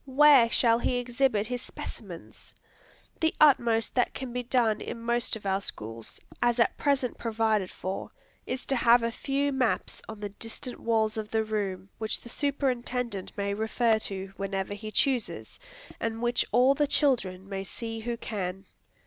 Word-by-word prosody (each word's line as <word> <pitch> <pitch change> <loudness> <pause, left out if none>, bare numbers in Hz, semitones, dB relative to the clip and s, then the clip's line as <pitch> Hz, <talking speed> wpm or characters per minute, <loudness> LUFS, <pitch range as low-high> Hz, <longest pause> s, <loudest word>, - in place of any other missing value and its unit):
where 270 -3 +7
shall 230 -1 +3
he 250 - 0
exhibit 245 -3 +1
his 245 +2 -3
specimens? - - -9 0.6
The 320 0 +1
utmost 235 -7 +4
that 245 - +1
can 260 -2 -5
be 250 - -1
done 240 -3 +1
in 235 - -5
most 235 0 +1
of 215 - -9
our 195 0 +1
schools, 115 - -6 0.2
as 240 0 +2
at 235 - +3
present 275 -4 0
provided 220 -4 +1
for, 190 +1 -5 0.4
is 255 +1 -3
to 270 - 0
have 235 0 +5
a 230 - 0
few 280 +4 -1
maps 260 -4 0
on 220 -1 -7
the 205 -1 -4
distant 225 +4 -7
walls 220 -1 +1
of 215 -1 -4
the 220 0 +1
room 200 -3 -3
which 220 -1 -1
the 235 - -10
superintendent 250 -7 -1
may 200 0 -1
refer 220 +1 +2
to, 195 -2 -6
whenever 195 0 -2
he 215 +1 -6
chooses, 255 +1 -1 0.4
and 225 0 -2
which 240 +1 +2
all 250 +4 +5
the 290 +1 +1
children 200 -11 +1
may 195 -1 -4
see 225 +3 -6
who 235 +1 -3
can! 195 -4 -4
230 Hz, 165 wpm, -28 LUFS, 205-250 Hz, 0.6 s, where